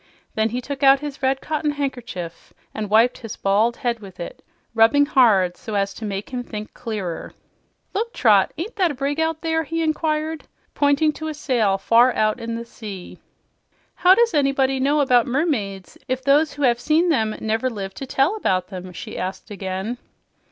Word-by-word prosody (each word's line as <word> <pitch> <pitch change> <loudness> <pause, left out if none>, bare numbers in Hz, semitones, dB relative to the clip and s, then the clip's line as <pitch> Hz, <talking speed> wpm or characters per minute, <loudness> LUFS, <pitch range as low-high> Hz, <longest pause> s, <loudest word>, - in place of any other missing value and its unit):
Then 220 +1 +1
he 245 +3 -3
took 280 +2 -6
out 275 0 +6
his 290 -3 -6
red 265 0 +1
cotton 305 -1 -1
handkerchief 245 - -5 0.2
and 215 -2 -4
wiped 225 +4 +4
his 225 -4 -7
bald 210 +4 +1
head 240 -2 -1
with 190 -3 -13
it, 170 - -8 0.3
rubbing 230 +6 +5
hard 210 -11 +4
so 215 - -6
as 195 0 0
to 225 - -7
make 200 +2 -5
him 250 -1 -3
think 215 -3 -7
clearer. 210 -8 -5 0.6
"Look, 460 +3 -2
Trot; 205 - +4
ain't 390 +8 -5
that 370 -3 +3
a 290 - -4
brig 280 +3 -2
out 320 0 0
there?" 320 0 +1
he 330 +2 -2
inquired, 310 0 -1 0.3
pointing 285 +2 +3
to 315 +1 -6
a 310 - -4
sail 235 -9 +1
far 235 +5 +4
out 215 +2 +1
in 230 0 -4
the 235 0 -5
sea. 205 -6 -9 0.7
"How 365 +1 +5
does 470 -2 +3
anybody 275 -2 +2
know 285 +3 +2
about 250 -3 +3
mermaids 235 - -2
if 255 0 -2
those 290 +3 +3
who 290 - -4
have 240 -2 +3
seen 315 +7 +2
them 220 -8 +1
never 225 +3 0
lived 195 -4 -6
to 270 - -6
tell 275 +10 +2
about 185 - 0
them?" 185 -2 -7
she - - -7
asked 190 +3 -5
again. 195 +4 -4
250 Hz, 185 wpm, -22 LUFS, 210-290 Hz, 0.7 s, out